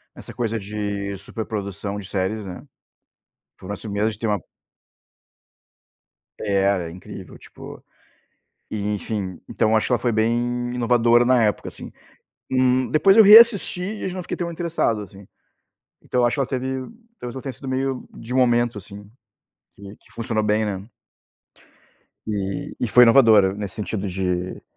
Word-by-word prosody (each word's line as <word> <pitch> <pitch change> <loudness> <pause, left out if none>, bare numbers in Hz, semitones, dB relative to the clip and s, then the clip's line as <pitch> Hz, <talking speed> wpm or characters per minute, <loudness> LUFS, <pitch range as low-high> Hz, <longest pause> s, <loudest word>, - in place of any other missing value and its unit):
nessa - - -11
coisa 115 -2 -2
de 100 -1 -4
superprodução 100 -1 -5
de 95 - -9
séries, 100 +2 -2
né, 90 -1 -8 0.9
foi 95 - -12
um - - -10
lance 100 +2 -7
meio 105 +2 0
de 105 - -12
ter 115 - -2
uma 105 -2 0 2.0
Era 100 -3 0
incrível, 90 +1 -11
tipo, - - -12 0.9
e 110 - -4
enfim, 100 -3 -4
então 110 0 +1
acho 110 - +1
que - - -5
ela - - +2
foi 120 - 0
bem 110 +2 +1 0.4
inovadora 120 0 +3
na 125 -2 +4
época, 105 - 0
assim. - - -8 0.6
Hum, 130 0 +2
depois 195 +7 +4
eu 220 - +10
reassisti 210 -3 +7
e 205 0 -4
já 185 - -5
não 185 - -4
fiquei - - -5
tão 170 -1 -3
interessado, 165 -10 -1
assim. 100 -1 -12 0.7
Então 125 -1 0
acho 120 - +1
que - - -4
ela 135 - 0
teve 130 -1 -2 0.5
talvez 125 +1 -7
ela 130 - -6
tenha 135 -2 -5
sido 135 - -11
meio 130 0 -2
de 120 +2 -8
momento, 120 -3 +2
assim, 100 +1 -12 0.7
que 100 +1 -11
que - - -26
funcionou 115 -2 -2
bem, 105 +1 +1
né. 100 +2 -5 1.4
E 100 -2 -4
e 120 - 0
foi 125 +4 +6
inovadora 115 -6 +6
nesse 100 -2 -6
sentido 105 -1 -3
de 90 -1 -3
110 Hz, 155 wpm, -22 LUFS, 100-125 Hz, 2.0 s, eu